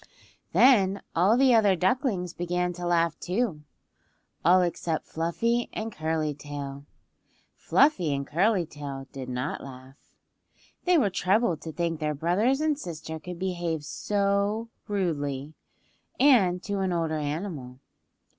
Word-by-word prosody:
Then 200 -7 +4
all 190 +7 +4
the 265 -1 +5
other 210 -4 +5
ducklings 190 - 0
began 180 0 -1
to 175 0 -5
laugh, 170 -1 +1
too;—all 180 - -2
except 170 -2 -2
Fluffy 230 +9 -1
and 220 +1 -4
Curly 155 -3 -1
Tail. 140 -1 -7 0.7
Fluffy 190 - +3
and 140 0 -2
Curly 185 +5 +2
Tail 140 -3 -7
did 130 -2 -7
not 125 +3 -3
laugh. 130 0 -11 0.9
They 360 -1 +5
were 215 -10 +2
troubled 185 -3 +1
to 160 - -6
think 165 -1 -2
their 150 -1 -1
brothers 205 - +1
and 305 -2 +1
sister 160 - -6
could 180 +2 -8
behave 175 -4 -2
so 200 +5 0 0.2
rudely, 150 -7 -2 0.7
and 200 -10 +4
to 200 -1 -2
an 190 -1 0
older 165 -2 -1
animal. 145 -4 -4
175 Hz, 125 wpm, -27 LUFS, 150-205 Hz, 0.9 s, the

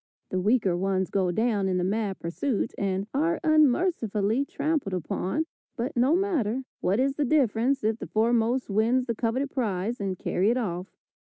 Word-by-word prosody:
The 185 - -1
weaker 205 -2 +2
ones 190 +1 -1
go 190 -2 +1
down 210 +1 +1
in 185 - +1
the 180 - 0
mad 200 +1 -1
pursuit, 200 +8 -2
and 195 -1 -1
are 320 +5 +1
unmercifully 275 - +2
trampled 285 - -1
upon, 185 - -2 0.3
but 250 +4 -3
no 255 +6 +3
matter, 275 - 0 0.2
what 195 +5 +1
is 270 +1 +1
the 295 - +1
difference 260 -2 +2
if 220 +1 0
the - - -6
foremost 235 +3 +1
win 225 +5 +2
the 240 -2 -2
coveted 250 +5 -1
prize 225 -2 -2
and 190 -2 -2
carry 190 +4 +1
it 240 - +2
off. 180 -6 -3
225 Hz, 170 wpm, -27 LUFS, 195-270 Hz, 0.3 s, no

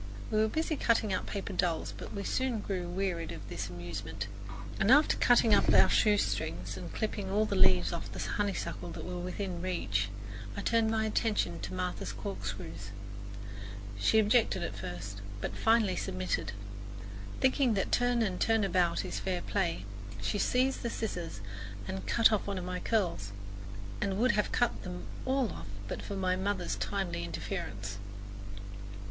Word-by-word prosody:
We 215 - +3
were 220 - +5
busy 315 +6 0
cutting 225 -5 +3
out 185 - -1
paper 200 -1 -3
dolls; 175 -3 0
but - - -7
we 200 - -3
soon 250 -4 0 0.3
wearied 180 -4 -1
of - - -7
this 100 -1 -3
amusement, 90 +3 -5 0.5
and 195 - +3
after 295 +4 +7
cutting 235 -3 +5
up - - +5
our - - +7
shoestrings 210 -1 +2
and - - -6
clipping 210 -3 -2
all 210 +2 +3
the 200 - -1
leaves 90 - +5
off 100 +1 -4
the 100 - -7
honeysuckle 200 - -1
that - - -6
were 180 0 -4
within 180 0 -3
reach, 105 - 0 0.5
I - - -1
turned 230 -1 +3
my 220 0 +2
attention 210 - +1
to - - -5
Martha's 180 - -2
corkscrews. 100 0 -5 1.1
She 100 - +4
objected 215 -3 +4
at 105 - -3
first, 100 +1 -5 0.2
but - - -3
finally 225 -4 +4
submitted. 90 0 -1 0.9
Thinking 260 -3 +4
that 195 - 0
turn 245 -1 +3
and 185 -4 -1
turn 225 -1 +4
about 180 -3 +2
is - - -3
fair 180 -2 -1
play, 170 - 0 0.3
she 105 - -1
seized 260 +4 +2
the 235 - -1
scissors 175 - -3 0.5
and 95 +1 -4
cut 230 -1 +6
off 215 -2 +1
one 200 -1 -1
of 180 - -3
my 180 0 -2
curls, 175 - 0 0.7
and 195 -1 0
would 245 +4 +5
have 210 -2 +1
cut 240 - +2
them 180 -1 -6 0.2
all 260 -5 +2
off 80 +4 -7 0.2
but - - -3
for 200 - -4
my 185 -1 +2
mother's 190 -1 0
timely 195 - -1
interference. 100 +3 -4
190 Hz, 165 wpm, -32 LUFS, -, 1.1 s, after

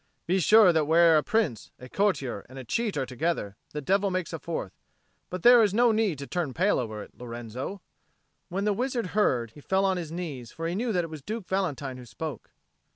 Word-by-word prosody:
"Be 185 +3 +2
sure 210 +1 +6
that 160 -2 +2
where 165 +1 +5
a 155 - +5
prince, 160 - -1
a 125 - -11
courtier, 140 - 0
and 130 - -11
a 130 - -6
cheat 220 - -1
are - - 0
together, 130 -5 -2
the 150 - -5
devil 195 +6 +2
makes 185 -2 -3
a 165 - -4
fourth. 150 - -4 0.6
But 185 -1 -5
there 245 -1 +8
is 205 -2 +2
no 240 0 +5
need 215 -7 +1
to 140 - -6
turn 160 -4 -3
pale 190 +5 +2
over 110 -4 -4
it, - - -16
Lorenzo." 120 - -6 0.7
When 195 +3 -2
the 210 - +2
wizard 245 -1 -1
heard, 125 - +2
he 145 - -14
fell 190 +5 +1
on 190 -1 +2
his 165 -3 -5
knees; 150 -9 -6
for 165 0 -4
he 170 - -2
knew 230 +5 -1
that 180 -4 +1
it 165 - -7
was 155 -2 -7
Duke 215 +5 -5
Valentine 145 -9 -2
who 125 - -10
spoke. 150 0 -6
170 Hz, 220 wpm, -27 LUFS, 135-200 Hz, 0.7 s, there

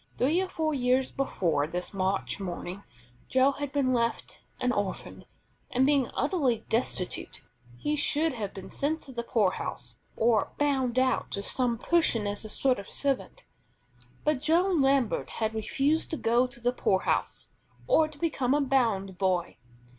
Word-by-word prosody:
Three 310 +8 +2
or 380 - -3
four 315 -3 -1
years 255 0 +1
before 170 - 0
this 180 +4 -4
March 190 +1 -1
morning, 185 0 -5 0.5
Joe 260 +2 +4
had 285 0 -5
been 275 -3 +1
left 235 -1 -1 0.2
an 250 - +1
orphan, 205 -5 -4 0.4
and 260 +1 +2
being 275 -3 +3
utterly 265 - 0
destitute, 220 -5 -2 0.3
he 300 - -1
should 300 +1 +2
have 210 -5 -4
been 195 - -10
sent 310 +3 -1
to 270 - -11
the 240 -2 -3
poorhouse, 185 - -1 0.2
or 225 -2 +2
"bound 265 -4 +1
out" 255 -1 +2
to 200 - -1
some 245 +1 +1
person 250 -6 +2
as 205 +1 -3
a 215 - -7
sort 255 +2 +2
of 200 - -9
servant. 280 - -2 0.8
But 300 -3 +1
Joe 335 +5 +3
Lambert 270 - +2
had 220 -1 -2
refused 275 +8 0
to 320 - -3
go 240 +1 +2
to 245 - -14
the 245 +1 0
poorhouse 190 -6 0 0.4
or 320 -11 +4
to 305 -1 -13
become 285 -5 0
a 295 - +2
bound 225 -9 0
boy. 185 -3 0
250 Hz, 160 wpm, -28 LUFS, 205-285 Hz, 0.8 s, Joe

